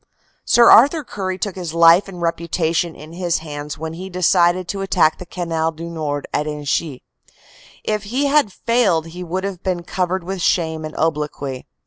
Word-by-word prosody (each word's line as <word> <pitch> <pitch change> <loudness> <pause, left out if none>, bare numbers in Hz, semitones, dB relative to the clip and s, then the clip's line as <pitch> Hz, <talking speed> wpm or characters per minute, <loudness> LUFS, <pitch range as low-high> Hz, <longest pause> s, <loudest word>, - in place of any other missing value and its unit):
Sir 235 -1 +6
Arthur 290 +6 +6
Currie 190 -6 -4
took 195 0 -3
his 175 -3 -5
life 170 +3 +6
and 185 -2 -9
reputation 170 0 -1
in 155 +2 -12
his 175 -1 -1
hands 150 -1 -7
when 160 +1 -5
he 185 +3 -7
decided 180 0 +2
to 200 -1 -3
attack 180 -5 +2
the 180 - -9
Canal 165 -2 -2
du 165 +1 -8
Nord 145 -3 -3
at 150 - 0
Inchy. 150 -1 -2 0.8
If 215 -1 -2
he 255 +7 -1
had 280 -6 +3
failed 200 -8 +1
he 175 +2 -8
would 180 +2 -3
have 195 -3 -4
been 180 -2 -2
covered 180 +1 -2
with 190 +1 -5
shame 160 -2 0
and 155 - -8
obloquy. 150 -4 -2
170 Hz, 175 wpm, -20 LUFS, 160-190 Hz, 0.8 s, Sir